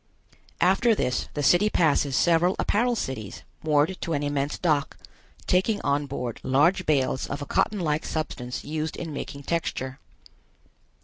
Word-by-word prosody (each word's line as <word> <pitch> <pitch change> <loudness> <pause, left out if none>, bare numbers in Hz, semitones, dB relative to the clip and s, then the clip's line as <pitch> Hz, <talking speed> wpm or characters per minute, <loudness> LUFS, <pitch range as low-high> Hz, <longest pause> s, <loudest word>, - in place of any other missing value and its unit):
After 195 +6 +4
this 125 -9 -1
the 145 - -1
city 175 +9 +5
passes 145 -7 +2
several 170 +6 +3
apparel 240 +4 +1
cities 125 - -5 0.2
moored 155 +4 +1
to 165 - -2
an 145 -1 -1
immense 145 0 -1
dock, 150 -5 0 0.5
taking 195 +4 +2
on 145 0 0
board 125 -4 -4
large 170 +8 +2
bales 135 -3 +1
of 140 - -4
a - - -6
cotton 210 +7 0
like 155 -3 0
substance 125 -6 -4
used 155 +1 -3
in 165 -3 -5
making 140 0 -6
texture. 135 -5 -3
150 Hz, 145 wpm, -26 LUFS, 140-175 Hz, 0.5 s, city